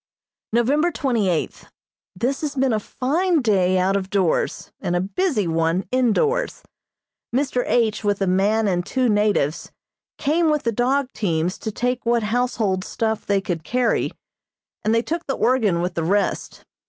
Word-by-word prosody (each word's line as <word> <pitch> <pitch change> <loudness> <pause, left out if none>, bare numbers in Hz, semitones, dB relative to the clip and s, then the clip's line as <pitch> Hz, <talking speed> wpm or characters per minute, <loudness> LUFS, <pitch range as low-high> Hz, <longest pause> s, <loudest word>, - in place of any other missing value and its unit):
November 275 +9 +2
twenty 240 - 0
eighth: 165 -3 -3 0.5
This 250 +8 -1
has 300 -2 -3
been 265 -2 +2
a 215 - +1
fine 320 - 0
day 185 -4 +3
out 185 +2 +2
of 190 -1 -2
doors, 190 -5 0
and 175 -2 -1
a - - +2
busy 210 - 0
one 165 +3 0
indoors. 260 - +1 0.7
Mr. 260 0 0
H. 225 -3 +1
with 205 -1 +1
a 195 - +1
man 205 +4 +2
and 180 -2 0
two 255 +6 0
natives 205 -8 +1 0.5
came 315 +3 +2
with 300 -1 +1
the 230 - +1
dog 255 +4 +1
teams 175 -3 -1
to 220 - -4
take 245 +3 -2
what 235 -1 +1
household 215 -4 0
stuff 220 +1 -2
they 200 -1 +2
could 175 -4 -3
carry, 245 +5 +1 0.7
and 220 +1 +2
they 230 - +2
took 335 +4 -4
the 270 - -1
organ 220 -9 +2
with 180 +1 -2
the 165 - -2
rest. 200 +5 -1
220 Hz, 165 wpm, -22 LUFS, 190-260 Hz, 0.7 s, day